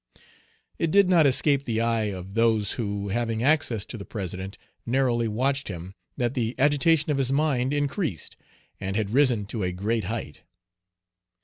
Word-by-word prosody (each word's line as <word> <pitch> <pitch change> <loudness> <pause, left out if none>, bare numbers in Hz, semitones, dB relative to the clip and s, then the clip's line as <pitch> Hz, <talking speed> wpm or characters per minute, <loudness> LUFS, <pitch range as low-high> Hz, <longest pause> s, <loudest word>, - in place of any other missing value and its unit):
It 165 - +1
did 200 +2 +4
not 165 -5 +5
escape 140 +1 +3
the 115 -3 -1
eye 115 -1 +1
of 95 -2 -6
those 110 -2 +2
who, 100 -3 -3
having 115 +1 -1
access 130 -7 +2
to 115 - -7
the - - -6
President, 95 -1 -6 0.3
narrowly 120 -2 +1
watched 135 +5 0
him, 90 0 -7 0.2
that 120 0 0
the 120 -3 -2
agitation 145 +3 +3
of 140 - 0
his 135 -1 +1
mind 135 -3 +1
Page 145 +1 0
150 - - +2 0.2
increased, 80 - -8 0.4
and 95 0 -4
had 105 -1 -1
risen 125 -5 +3
to 105 +2 -5
a 90 -1 -1
great 105 +3 -2
height. 110 -8 -5
115 Hz, 175 wpm, -25 LUFS, 100-135 Hz, 0.4 s, not